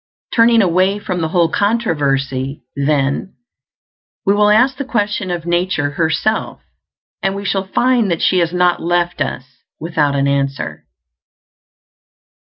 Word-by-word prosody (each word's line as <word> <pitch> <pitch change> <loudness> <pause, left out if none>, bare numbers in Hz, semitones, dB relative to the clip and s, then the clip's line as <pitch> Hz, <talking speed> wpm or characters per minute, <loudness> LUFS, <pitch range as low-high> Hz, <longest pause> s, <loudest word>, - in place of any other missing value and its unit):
Turning 230 -1 +5
away 185 +2 +2
from 185 -4 -4
the 160 - 0
whole 170 0 +2
controversy, 140 - -1
then, 140 +4 -1 0.9
we 200 - +4
will 210 0 +3
ask 250 +5 +4
the 280 - -3
question 210 -6 -2
of 175 -2 -3
nature 175 -4 0
herself, 170 +8 -1 0.6
and 195 0 -1
we 200 0 -6
shall 195 -1 -1
find 240 0 +2
that 170 -2 0
she 185 - +3
has 170 -1 +1
not 180 0 +1
left 175 -1 0
us 130 -2 -2 0.4
without 155 -3 0
an 140 0 +1
answer. 140 0 -2
175 Hz, 135 wpm, -17 LUFS, 145-205 Hz, 0.9 s, Turning